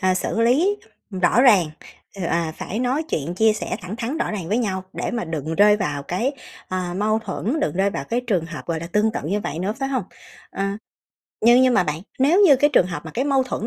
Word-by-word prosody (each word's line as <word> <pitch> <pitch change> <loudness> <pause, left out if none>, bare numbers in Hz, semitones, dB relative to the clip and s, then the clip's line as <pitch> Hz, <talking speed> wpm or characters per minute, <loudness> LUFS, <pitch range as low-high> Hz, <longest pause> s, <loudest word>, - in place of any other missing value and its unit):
ờ, 185 -1 +2
xử 185 +4 -1
lý 295 - +3 0.3
rõ 190 +3 +2
ràng, 205 -10 +6 0.5
ừ, 195 - -5
à, 170 -1 -1
phải 210 - -5
nói 255 +5 0
chuyện 160 +3 -2
chia 220 +3 +4
sẻ 215 - -4
thẳng 185 +4 -7
thắn 250 +7 -3
rõ - - -1
ràng 190 -6 -5
với 215 - +1
nhau 190 -6 -2
để - - -3
mà 235 -1 -2
đừng 160 -1 -4
rơi 210 +2 +5
vào 150 -8 -2
cái, 190 - -1 0.4
à, 180 -1 -3
mâu 215 +2 +1
thuẫn, 225 +7 -3
đừng 235 - -1
rơi 195 +1 +2
vào - - -4
cái 235 +2 -1
trường 185 -8 0
hợp, 165 -2 -8
gọi 165 -2 -2
là, 170 - -5
tương 215 +1 +2
tự - - -3
như 200 +7 -1
vậy 155 -5 -4
nữa, 190 +4 -1
phải 270 - -1
hông? 260 -8 -1 0.5
Ờ. 195 - -3 0.8
Nhưng 240 +3 +6
nhưng 255 -1 +4
mà - - +4
bạn, 150 0 -3 0.2
nếu 310 +9 +4
như 305 -9 +7
cái 290 +3 +3
trường 180 - +4
hợp 165 -5 -6
mà - - -7
cái 255 - 0
mâu 275 -2 +2
thuẫn 230 -3 -4
210 Hz, 245 wpm, -22 LUFS, 175-245 Hz, 0.8 s, như